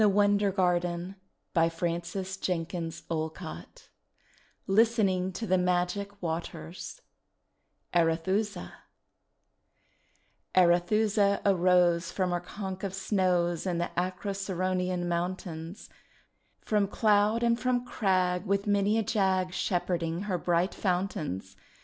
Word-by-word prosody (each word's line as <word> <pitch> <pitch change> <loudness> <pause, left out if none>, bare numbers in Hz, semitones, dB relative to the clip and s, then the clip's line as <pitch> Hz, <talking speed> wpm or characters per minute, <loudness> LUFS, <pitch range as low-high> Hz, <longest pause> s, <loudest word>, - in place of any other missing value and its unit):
WILLIAM 205 0 +4 0.2
BROWNE 180 0 0 0.4
OF 165 0 +4 0.3
TAVISTOCK 185 -2 -3
(condensed) 165 -3 -5 1.6
LISTENING 195 -3 +2
TO 225 +5 -5
THE 185 -2 +2
MAGIC 180 +3 -1
WATERS 160 - -5 0.9
ARETHUSA 175 +5 0 1.8
Arethusa 200 +3 +3
arose 180 -3 +3
From 185 -2 -1
her 175 - 0
conch 190 +1 -6
of 195 -1 -3
snows 180 -4 +1
In 175 -2 0
the 170 - -2
Acroceraunian 185 -1 -1
mountains, 175 0 -4 0.4
— - - -41 0.3
From 210 -2 +1
cloud 210 +2 +2
and 235 0 +2
from 250 -1 0
crag. 185 -6 +1
With 200 +1 +1
many 205 +1 +2
a 225 - +2
jag, 190 -4 +1
Shepherding 175 -2 -1
her 190 -4 -1
bright 175 +2 +1
fountains. 170 - -2
185 Hz, 100 wpm, -29 LUFS, 175-200 Hz, 1.8 s, WILLIAM